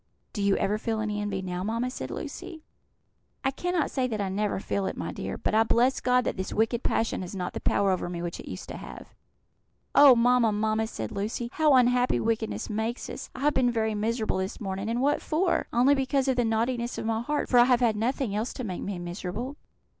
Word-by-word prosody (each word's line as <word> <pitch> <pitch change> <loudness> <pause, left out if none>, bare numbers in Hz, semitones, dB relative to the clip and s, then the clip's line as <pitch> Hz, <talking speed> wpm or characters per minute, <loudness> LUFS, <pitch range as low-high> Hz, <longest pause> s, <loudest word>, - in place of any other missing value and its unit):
"Do 205 - -3
you 200 -1 +3
ever 210 +2 0
feel 225 0 -2
any 210 -1 -2
envy 195 -2 -3
now, 180 0 -3
mamma?" 230 +4 -1
said - - -6
Lucy. 320 -3 -7 0.8
"I 270 - +2
cannot 355 +2 -1
say 260 -2 0
that 220 -4 -3
I 200 -2 -1
never 205 +1 -1
feel 195 0 -2
it, - - -4
my - - -3
dear; - - -5
but - - -2
I 220 - +5
bless 240 +3 +3
God 250 0 +3
that - - -2
this 190 - -3
wicked 225 +2 +1
passion 225 -6 0
has 185 +1 -6
not 180 -2 -3
the - - -4
power 200 -1 +2
over 180 -1 -1
me 175 -1 -4
which 170 0 -4
it - - -9
used - - -7
to - - -6
have." - - -10 0.8
"Oh, 280 -3 +9
mamma, 240 -1 +4
mamma!" 215 +1 0
said 110 - -5
Lucy, 220 +4 -3
"how 305 -2 +4
unhappy 250 0 +3
wickedness 225 -1 -1
makes 220 +2 -3
us! - - -7
I 255 - -7
have 295 +1 +3
been 255 -2 +3
very 220 -2 0
miserable 220 +1 -1
this 190 +3 -3
morning; 195 0 -3
and 235 +2 0
what 290 +2 +2
for? 345 +3 0
only 250 +4 +4
because 270 0 +1
of 260 - +2
the 245 -1 +2
naughtiness 235 +2 -1
of - - -4
my 225 0 0
heart, 295 +5 -1
for 245 - +5
I 240 - +8
have 250 -1 +4
had 230 -3 +3
nothing 235 +1 -1
else 215 +4 -2
to 255 - -5
make 185 -6 -4
me 200 -2 -4
miserable." 180 +9 -5
225 Hz, 230 wpm, -27 LUFS, 205-250 Hz, 0.8 s, Oh